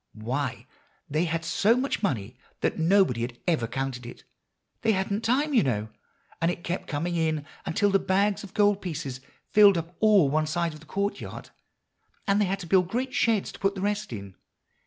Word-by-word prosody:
Why, 125 +6 -3 0.4
they 155 +4 0
had 165 0 -2
so 210 +8 +3
much 270 +2 -1
money 125 - -2 0.3
that - - 0
nobody 170 -7 +3
had 120 0 -4
ever 155 -10 +1
counted 130 +1 -3
it; - - -11 0.6
they 225 -1 +3
hadn't 200 +2 -1
time, 285 +6 +1
you 240 - +5
know. 110 -5 -1 0.5
And 165 - +3
it 175 - -4
kept 175 +2 -3
coming 165 +4 -2
in 160 -3 0 0.2
until 205 +4 +2
the 195 - +4
bags 200 +2 +1
of 195 -1 -11
gold 205 -1 +3
pieces 145 -7 -5 0.3
filled 205 -3 +7
up 170 +1 -5
all 210 -8 +5
one 155 +2 +1
side 170 +1 -1
of 155 - -11
the 165 - -17
courtyard, 200 +1 -4 0.7
and 200 +1 +2
they - - +3
had 195 +1 -1
to - - -6
build 180 +1 +3
great 255 +6 -2
sheds 225 -4 +1
to - - -13
put 195 0 +1
the 190 - -5
rest 205 0 -1
in." 100 -2 -7
175 Hz, 195 wpm, -27 LUFS, 150-205 Hz, 0.7 s, filled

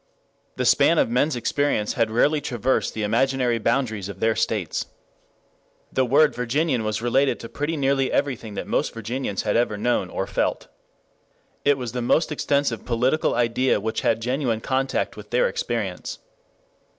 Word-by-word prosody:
The - - -1
span - - +4
of - - +2
men's 135 +4 +2
experience 120 -3 0
had 115 -2 +1
rarely 145 +7 +2
traversed 125 0 -1
the 110 - -2
imaginary 125 +1 +1
boundaries 110 -4 -1
of 100 - -8
their 110 0 +2
states. 110 -6 -1 1.1
The 130 - +2
word 145 +4 +4
Virginian 125 +1 0
was 110 +1 -2
related 135 +3 +2
to 115 - -7
pretty 150 +3 -3
nearly 135 -1 +1
everything 120 -7 -1
that - - -4
most - - -1
Virginians 115 -2 -3
had 105 - 0
ever 115 -3 +1
known 120 +4 0
or - - -3
felt. - - -2 0.9
It 145 -1 +3
was 125 -3 -5
the 125 - -3
most 155 +7 +2
extensive 140 -5 0
political 125 +5 +1
idea 120 0 +2
which 110 +2 -2
had 115 0 +1
genuine 125 -2 0
contact 135 +3 -1
with - - -11
their - - +2
experience. - - -3
125 Hz, 160 wpm, -23 LUFS, 115-135 Hz, 1.1 s, span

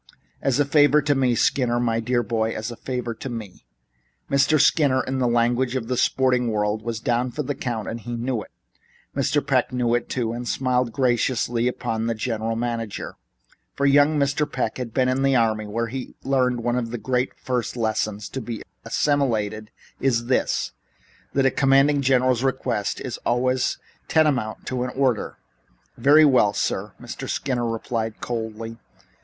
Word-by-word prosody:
As 135 0 +1
a 145 - +4
favor 145 0 +5
to 145 - +2
me, 130 -3 +2
Skinner, 120 -1 +2
my 115 -2 +1
dear 120 +1 0
boy, 110 0 -1
as 110 +2 -4
a - - -7
favor 125 -1 -4
to 130 - -7
me." 110 -6 -8 0.6
Mr. 140 +3 +4
Skinner, 140 -3 +4
in 130 0 -2
the 125 - +2
language 120 +2 +1
of 120 -2 -3
the 125 - +1
sporting 125 -1 +2
world, 105 0 0
was 115 0 -4
down 120 +2 0
for 150 +5 -4
the 145 - -2
count 120 -5 -4
and 115 - -4 0.2
knew 120 -1 -2
it. - - -12 0.7
Young - - 0
Mr. - - +1
Peck - - +1
knew 125 -2 0
it 120 - 0
too, 115 -3 -1
and 120 +1 -5
smiled 125 -2 0
graciously 120 -1 +1
upon 115 -2 -2
the 115 - 0
general 115 0 -2
manager, 115 -2 -3 0.6
for 140 - 0
young 145 +2 +5
Mr. 140 +1 0
Peck 125 -1 -2
had 120 -3 -4
been 130 +2 +2
in 130 +1 +1
the 135 -1 +3
army, 110 -3 +1
where 115 +3 -1
one 125 -2 -1
of 120 -2 -1
the 120 - -4 0.4
first - - -33
great 125 -3 -1
lessons 110 -2 -1
to 135 - -5
be 115 -1 -6 0.2
assimilated 110 -7 0 0.3
is 120 -3 +1
this: 130 +1 0 0.6
that 135 - +2
the 135 - +4
commanding 140 +2 +4
general's 130 -2 +2
request 125 -6 -1
is - - -4
always 125 +1 0 0.3
tantamount 140 -9 +1
to 130 -1 -2
an 125 - -2
order. 130 -4 0 0.6
"Very 150 +3 +6
well, 125 -8 +4
sir," - - -2
Mr. - - -7
Skinner 120 -3 -1
replied 115 -1 -3
coldly. 115 -1 -5
125 Hz, 170 wpm, -23 LUFS, 115-130 Hz, 0.7 s, Very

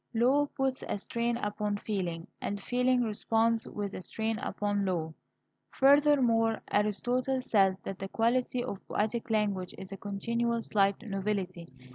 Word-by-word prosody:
Law 265 +6 +4
puts 270 -1 0
a - - -1
strain 235 +3 -1
upon 210 -2 -2
feeling, 180 -6 -3 0.2
and 205 - -2
feeling 250 +3 +2
responds 225 +1 +1
with 205 -1 -4
a - - -5
strain 220 +5 -2
upon 205 -1 -1
law. 165 -4 -1 0.6
Furthermore, 265 -5 +4
Aristotle 245 +6 +1
says 195 -5 +3
that 195 - -6
the 195 - -5
quality 245 +3 +1
of 200 -6 -5
poetic 220 +3 -1
language 200 -4 0
is 190 0 -9
a 195 - -6
continual 230 +4 -1
slight 200 -1 +2
novelty. 195 -4 -3
215 Hz, 140 wpm, -30 LUFS, 195-240 Hz, 0.6 s, Law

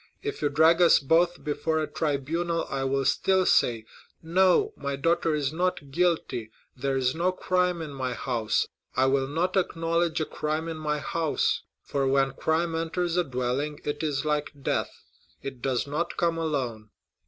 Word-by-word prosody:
If 425 -1 -4
you 145 - +2
drag 160 +4 +4
us 170 - +7
both 170 +5 +2
before 160 +1 -1
a 155 - +1
tribunal 160 +3 -1
I 135 -1 -1
will 135 0 0
still 190 +6 +2
say, 115 -8 +3 0.4
'No, 190 - +3
my 140 0 -3
daughter 165 +2 +1
is 145 -1 -1
not 170 -5 -1
guilty;—there 135 -5 -1
is 130 -1 +1
no 175 +3 +1
crime 180 -2 0
in 150 -3 -7
my 130 -2 -2
house. 115 -5 0 0.3
I 130 +1 +3
will 135 0 +2
not 170 +6 -1
acknowledge 170 -2 +1
a 155 - 0
crime 155 +2 -3
in 165 -1 -4
my 150 -1 -1
house; 160 +1 0 0.2
for 140 -1 -1
when 135 0 +3
crime 160 +4 0
enters 165 +1 -1
a 180 - +3
dwelling, 135 +2 -2
it 145 0 -3
is 150 -3 -1
like 150 -1 0
death—it 135 -1 -5
does 130 -2 0
not 150 +4 -3
come 170 -1 +1
alone. 125 -9 -2
155 Hz, 165 wpm, -27 LUFS, 135-170 Hz, 0.4 s, us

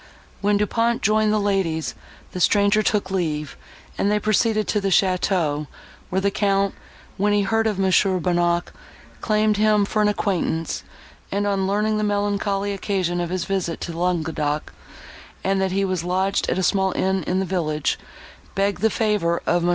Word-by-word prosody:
When 205 0 +2
Du 210 - +2
Pont 230 +2 0
joined 215 +1 +2
the 215 - +2
ladies, 195 -6 0 0.4
the 185 - -5
stranger 205 +3 +3
took 205 -3 0
leave, 155 -5 -2 0.4
and 200 - +2
they 210 - +3
proceeded 215 +1 +1
to 210 - +1
the 195 - -1
château, 180 -6 +1 0.4
where 190 - 0
the 200 +1 +1
Count, 195 -1 +1 0.4
when 205 +1 +2
he 205 -1 +3
heard 225 +2 +1
of 210 -3 -1
Mons. 190 -1 +4
Bonnac, 175 -2 0 0.5
claimed 215 -1 +2
him 210 -1 +3
for 215 +1 0
an 210 - +4
acquaintance, 180 -5 -1 0.5
and, 200 +1 0
on 195 -2 0
learning 210 +2 +1
the - - 0
melancholy 205 -1 0
occasion 185 -3 -1
of 175 - -3
his 185 0 -2
visit 185 -4 -2
to 170 - -4
Languedoc, 160 -4 -1 0.7
and 195 0 +1
that 190 -1 0
he 195 +1 +1
was 185 -3 -2
lodged 190 +2 0
at - - 0
a 190 - 0
small 190 0 +2
inn 190 0 0
in 185 - 0
the 190 - 0
village, 155 -5 -1 0.6
begged 195 -1 0
the 220 - +4
favour 210 -6 0
of 175 0 +2
Mons. 175 - +1
195 Hz, 175 wpm, -22 LUFS, 180-205 Hz, 0.7 s, Mons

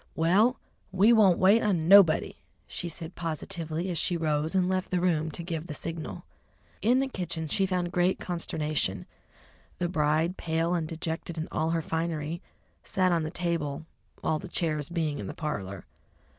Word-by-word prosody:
"Well, 200 +10 +3 0.3
we 200 +5 +5
won't 200 -6 +5
wait 200 +5 +5
on 180 -7 +1
nobody," 195 -4 +6 0.3
she 175 - -5
said 165 +1 -6
positively, 165 +1 -4
as 170 - -1
she 175 - 0
rose 155 +1 0
and 185 -1 +3
left 185 0 -1
the 180 - +1
room 160 -3 +1
to 165 +2 -6
give 165 -1 -4
the 150 - -5
signal. 165 0 -6 0.6
In 245 +4 +4
the 270 - +1
kitchen 170 -9 -3
she 190 +6 +1
found 180 -2 -1
great 180 +1 +2
consternation: 155 - -2 0.7
the 175 - 0
bride, 160 +1 +1
pale 165 +1 0
and 165 -3 -1
dejected 165 +1 -4
in 160 - -3
all 160 +1 0
her 165 -1 0
finery, 160 0 -2 0.4
sat 185 -1 +1
on 170 -1 +2
the 155 - -3
table, 165 -4 -2 0.4
all 155 - +1
the - - -8
chairs 155 -5 -1
being 160 -4 -1
in 100 - -5
the - - -6
parlour. 100 - -4
165 Hz, 170 wpm, -28 LUFS, 155-180 Hz, 0.7 s, nobody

